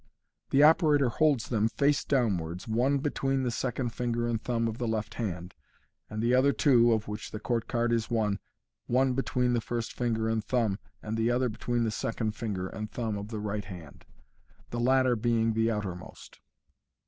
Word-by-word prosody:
The 140 +2 +5
operator 150 -4 +5
holds 145 -3 +2
them, 110 -2 +2
face 140 +5 +1
downwards, 95 - -1
one 125 +6 +2
between 135 -1 -1
the 125 - 0
second 125 +1 -2
finger 120 0 -2
and 115 -2 -1
thumb 115 -2 0
of 115 +1 -4
the 120 - -1
left 110 -2 -2
hand, 90 -5 -4 0.6
and 110 +1 -3
the 120 +1 +2
other 130 +2 +5
two 120 -5 +4
(of 110 -1 0
which 105 +1 -5
the 110 - -6
court 115 0 -1
card 120 -1 0
is 115 -1 0
one) 105 -4 0 0.5
one 130 +1 +2
between 125 -1 0
the 120 - +1
first 115 0 -4
finger 115 -2 -1
and 110 -1 0
thumb, 110 -3 0 0.2
and 110 +1 -3
the 115 +1 +2
other 125 +1 +1
between 120 +2 -1
the 110 - 0
second 110 0 -2
finger 105 -4 -4
and 105 +2 -6
thumb 115 -3 -3
of 100 0 -5
the 110 0 -5
right 105 -1 -3
hand, 90 -6 -11 0.7
the 120 - -3
latter 130 0 +3
being 115 0 +1
the 115 +1 +2
outermost. 95 -5 -6
115 Hz, 185 wpm, -29 LUFS, 110-125 Hz, 0.7 s, The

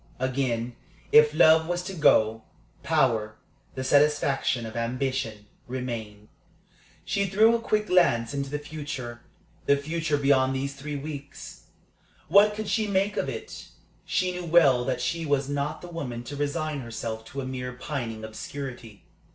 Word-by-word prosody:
Again, 125 -2 -1 0.4
if 150 0 +7
love 160 0 +5
was 175 0 -1
to 190 +1 -6
go, 115 -9 +3 0.4
power, 110 -4 +1 0.4
the 130 - -3
satisfaction 135 -3 +2
of 110 - -8
ambition, 120 -2 -2 0.2
remained. 115 -5 -5 0.8
She 200 -2 0
threw 220 +5 +5
a 230 - -2
quick 215 -2 0
glance 140 - +3
into 140 -1 -3
the 145 - -2
future 145 -5 -6 0.5
the 140 - +5
future 155 +1 -1
beyond 135 -2 +3
these 140 +1 -2
three 145 +2 -6
weeks. 145 0 -8 0.6
What 210 +1 +6
could 215 0 -4
she 215 +2 +1
make 200 +1 +1
of - - -1
it? - - -7 0.4
She 185 -1 0
knew 180 -1 -5
well 145 -7 +5
that 130 - -1
she 170 -1 -1
was 140 -3 0
not 145 +3 -3
the - - -7
woman 130 -9 -5
to 145 +4 -7
resign 145 +1 -2
herself 115 -2 -5
to 140 +4 -6
a - - -5
mere 125 -1 -5
pining 120 -4 -5
obscurity. 115 -1 -8
140 Hz, 150 wpm, -26 LUFS, 125-160 Hz, 0.8 s, if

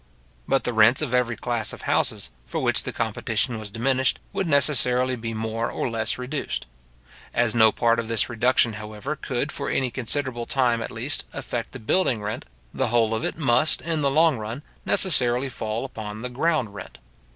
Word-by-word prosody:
But 135 - +2
the 125 - -1
rents 115 +6 +5
of 130 -5 -3
every 125 -2 +2
class 120 -3 0
of - - -10
houses - - 0 0.2
for - - -4
which - - +3
the - - -4
competition 115 +1 -2
was 110 -1 -6
diminished, 130 +4 +1 0.2
would 190 - -1
necessarily 130 -3 +3
be 115 -1 -5
more 110 +1 -2
or 120 - -3
less 115 0 -1
reduced. 130 +4 -4 0.7
As 120 -2 +2
no 110 -2 +6
part 115 +1 +2
of 115 - -3
this 115 -2 +1
reduction, 120 0 +2
however, 105 +7 -5
could 140 +1 -3
for 140 - -4
any 130 -2 0
considerable 130 -1 -1
time 120 -4 +2
at - - -4
least, 125 +5 -2
affect 115 -2 -4
the 135 - -8
building 120 +1 +1
rent, 105 +1 -5 0.3
the - - 0
whole 115 -1 +2
of 110 - -2
it - - -2
must, 135 0 +3
in 165 -2 -2
the 140 - +2
long 155 -2 +3
run, 115 +6 -6 0.2
necessarily 130 -7 +3
fall 110 0 -3
upon 110 -3 -7
the 125 - -3
ground 130 -4 0
rent. 95 -11 -9
120 Hz, 185 wpm, -24 LUFS, 115-135 Hz, 0.7 s, no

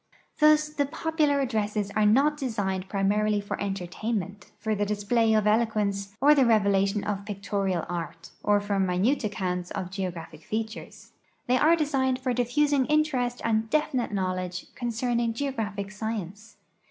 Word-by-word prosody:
Thus 305 0 +5
the 290 -2 -1
popular 305 -2 +1
addresses 210 -4 -1
are 210 +1 +2
not 275 +8 +4
designed 200 -9 -2
primarily 210 +1 +1
for 200 - -5
entertainment, 200 +1 -4
for 215 +1 -2
the 205 0 0
display 210 +3 +1
of 215 -1 +2
eloquence 210 -2 0
or 290 +3 +6
the 280 -3 +4
revelation 200 -3 +2
of 205 -1 -3
pictorial 200 -3 -2
art, 170 -1 -6
or 205 0 +3
for 205 -1 -1
minute 190 +9 +1
accounts 180 -3 -2
of 185 -2 -5
geogra|)hic 175 -5 -5
features; 220 +4 -6 0.3
they 250 +1 +2
are 320 +3 +5
designed 270 -5 +1
for 255 -1 -1
diffusing 265 +3 +2
interest 275 -5 +1
and 220 -1 0
definite 270 -6 0
knowledge 185 -2 -3
concerning 235 -1 -1
geographic 215 -7 -3
science. 210 -1 -6
215 Hz, 140 wpm, -27 LUFS, 200-250 Hz, 0.3 s, or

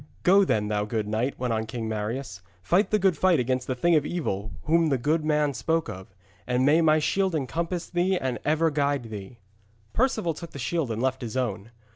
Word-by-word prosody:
Go 195 +2 +6
then, 105 - +1
thou 105 0 0
good 105 0 -2
knight,' 115 +6 -1
went 125 -2 -1
on 110 0 -2
King 115 0 -4
Marius, 110 -2 -4 0.2
'fight 185 - +2
the 215 - +3
good 190 -4 +2
fight 175 0 +3
against 125 +1 -1
that 130 - -1
thing 170 +6 +3
of 155 -3 +4
evil 110 - -3
whom 165 +1 +3
the 135 - +2
good 150 +6 0
man 150 -2 +1
spoke 160 +5 -1
of, 95 +1 -9 0.3
and 125 +1 +1
may 155 +4 +5
my 155 -1 +4
shield 190 +3 +1
encompass 165 +5 -2
thee 180 +2 +1
and 130 -7 -2
ever 155 +2 +2
guard 140 -5 -1
thee.' 105 +2 -8 0.6
Perceval 220 -9 +1
took 170 +2 -10
the - - -7
shield 140 +2 -1
and 115 +2 -2
left 130 0 0
his 120 +1 -4
own. 115 -4 -2
140 Hz, 210 wpm, -26 LUFS, 115-165 Hz, 0.6 s, Go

